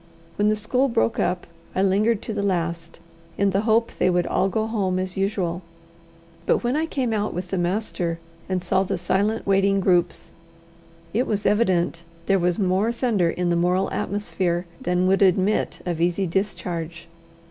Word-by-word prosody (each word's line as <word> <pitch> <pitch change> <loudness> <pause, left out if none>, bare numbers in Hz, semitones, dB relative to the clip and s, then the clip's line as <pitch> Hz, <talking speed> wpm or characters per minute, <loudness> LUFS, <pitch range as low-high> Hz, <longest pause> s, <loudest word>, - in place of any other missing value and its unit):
When 205 +1 +2
the 215 - +2
school 250 +6 +1
broke 115 - +1
up, 180 0 0 0.3
I 190 - +2
lingered 205 +3 +2
to 220 - -4
the 205 - -2
last, 170 -3 -2 0.4
in 200 0 +2
the 195 +1 +1
hope 230 +1 +3
they - - +1
would 175 -1 +1
all 195 - +1
go 220 +3 -1
home 200 -5 -1
as 185 0 -3
usual; 190 -3 -1 0.9
but - - +2
when 240 +3 0
I 315 +2 0
came 255 -7 -1
out 210 -3 -1
with 180 0 -4
the 190 - -2
master, 175 -2 -1 0.3
and 185 -1 -1
saw 185 - +2
the 195 0 -1
silent 205 +5 0
waiting 195 0 +3
groups, 180 -2 +1 0.8
it 240 +5 +1
was 205 -1 -2
evident 180 -6 +1 0.2
there 195 +1 +3
was 175 0 +1
more 195 +3 +1
thunder 230 -8 +1
in 175 +1 -1
the - - +2
moral 180 +2 +1
atmosphere 185 -3 -1 0.2
than 180 +1 +1
would 190 +2 +3
admit 190 +2 +2
of 170 -2 -2
easy 175 +3 +1
discharge. 170 -3 -3
190 Hz, 175 wpm, -23 LUFS, 175-210 Hz, 0.9 s, hope